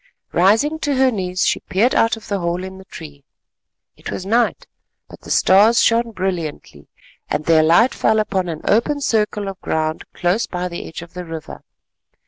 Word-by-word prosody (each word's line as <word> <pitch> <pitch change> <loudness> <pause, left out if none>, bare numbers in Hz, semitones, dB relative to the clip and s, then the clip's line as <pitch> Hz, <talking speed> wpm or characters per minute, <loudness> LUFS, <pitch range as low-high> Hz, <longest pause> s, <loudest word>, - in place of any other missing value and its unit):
Rising 225 - +2
to 290 -3 -1
her 260 0 +3
knees 185 -4 -1
she - - +1
peered 220 +7 +1
out 225 0 +2
of 220 - -13
the 200 -2 -2
hole 175 +1 -2
in 190 0 -8
the 190 - -13
tree. 145 -6 -11 0.7
It - - -9
was 185 - -5
night, 230 +4 +1 0.4
but - - -14
the - - -13
stars 210 +5 +5
shone 230 0 +3
brilliantly, 185 -7 -5 0.4
and 150 +1 -2
their 160 -1 +5
light 170 +11 +4
fell 220 0 +2
upon 190 -4 -1
an 160 -2 -5
open 235 +7 +1
circle 210 -5 0
of 195 -1 -7
ground 155 0 -2
close 180 +6 0
by 180 0 -4
the 170 - -7
edge 165 - -8
of 170 - -15
the 180 0 -6
river. 165 -2 -8
190 Hz, 185 wpm, -19 LUFS, 170-225 Hz, 0.7 s, stars